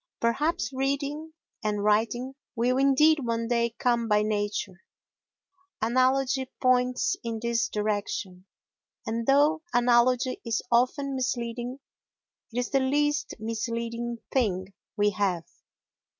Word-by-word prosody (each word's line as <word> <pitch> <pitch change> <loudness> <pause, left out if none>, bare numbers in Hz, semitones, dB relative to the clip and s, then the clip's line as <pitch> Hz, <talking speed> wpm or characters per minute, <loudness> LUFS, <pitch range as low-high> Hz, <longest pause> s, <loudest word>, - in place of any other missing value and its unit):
Perhaps 275 +6 0
reading 280 +4 -2 0.3
and 210 -1 -1
writing 230 +5 +1 0.2
will 250 +2 +1
indeed 300 +3 +5
one 230 -1 -1
day 235 -1 0
come 235 -2 +1
by 210 -1 +3
nature. 205 -3 -2 1.0
Analogy 260 +3 +2
points 255 +6 +2
in 230 -1 -3
this 230 -1 0
direction, 205 -3 -3 0.6
and 230 +1 -3
though 295 +4 +4
analogy 245 +1 +3
is 230 -2 -1
often 260 +4 +2
misleading, 245 -1 -3 0.7
it 235 - -7
is 245 - -5
the 275 - +3
least 295 +3 0
misleading 230 +1 -3 0.2
thing 195 -7 0 0.2
we 205 0 +3
have. 185 -4 0
240 Hz, 110 wpm, -27 LUFS, 225-265 Hz, 1.0 s, indeed